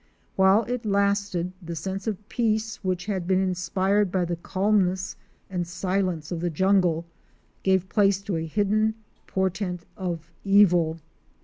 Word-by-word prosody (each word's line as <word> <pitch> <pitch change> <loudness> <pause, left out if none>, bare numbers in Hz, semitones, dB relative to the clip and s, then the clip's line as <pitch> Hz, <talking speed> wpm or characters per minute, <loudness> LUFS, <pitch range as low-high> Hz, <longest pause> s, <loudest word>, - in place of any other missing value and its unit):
While 190 +3 +5
it 245 +2 -3
lasted, 200 -3 +1
the 170 -1 -6
sense 190 +5 -4
of 210 -1 -4
peace 220 -1 0
which 185 -2 -2
had 190 -4 -2
been 190 0 +3
inspired 190 +2 +1
by 185 -1 +1
the 175 0 -2
calmness 190 +1 0 0.3
and 180 -2 -3
silence 180 -3 -2
of 170 - -2
the 175 +1 -1
jungle 175 -1 +2 0.6
gave 190 -1 +2
place 195 0 +3
to 195 -4 -2
a 160 0 -3
hidden 210 +4 +1 0.3
portent 185 -2 -2
of 170 -3 -4
evil. 180 -5 +4
190 Hz, 140 wpm, -25 LUFS, 175-200 Hz, 0.6 s, While